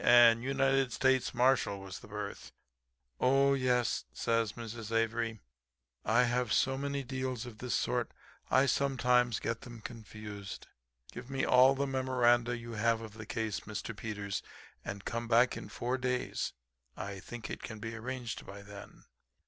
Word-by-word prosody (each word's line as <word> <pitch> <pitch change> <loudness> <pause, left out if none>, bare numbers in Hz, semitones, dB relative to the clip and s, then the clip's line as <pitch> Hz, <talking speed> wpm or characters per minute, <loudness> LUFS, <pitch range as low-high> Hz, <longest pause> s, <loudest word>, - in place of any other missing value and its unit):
'And 120 -1 +7
United 135 0 +2
States 130 +1 +2
Marshal 125 -5 +3
was 95 -1 -7
the - - -13
berth.' 105 -1 -6 0.7
"'Oh, 135 +1 +4
yes,' 125 -3 +1
says 115 -2 0
Mrs. 115 -1 -7
Avery. 115 -1 0 0.6
'I 115 +3 +5
have 120 -1 +1
so 135 +7 +3
many 140 0 -2
deals 130 -2 -3
of 115 -3 -10
this 125 -1 -1
sort - - 0 0.4
I 130 +1 +5
sometimes 125 -3 +2
get 115 0 -2
them 120 -3 -9
confused. 105 -3 -8 0.5
Give 120 +2 -9
me 135 -1 0
all 130 +2 +6
the 140 +1 0
memoranda 120 -2 +2
you 115 0 -8
have 115 +1 +1
of 110 -2 -8
the 110 -1 -9
case, 110 -2 -2
Mr. 110 +2 -6
Peters, 105 -2 -4 0.4
and 100 0 -6
come 115 0 -3
back 120 +2 +4
in - - -7
four 125 +2 -2
days. 125 -1 -1 0.4
I 100 +1 -5
think 120 +4 -7
it - - -5
can 110 - -6
be 115 +1 -5
arranged 120 +1 -5
by 100 0 -10
then.' 100 0 -11
120 Hz, 155 wpm, -32 LUFS, 110-130 Hz, 0.7 s, And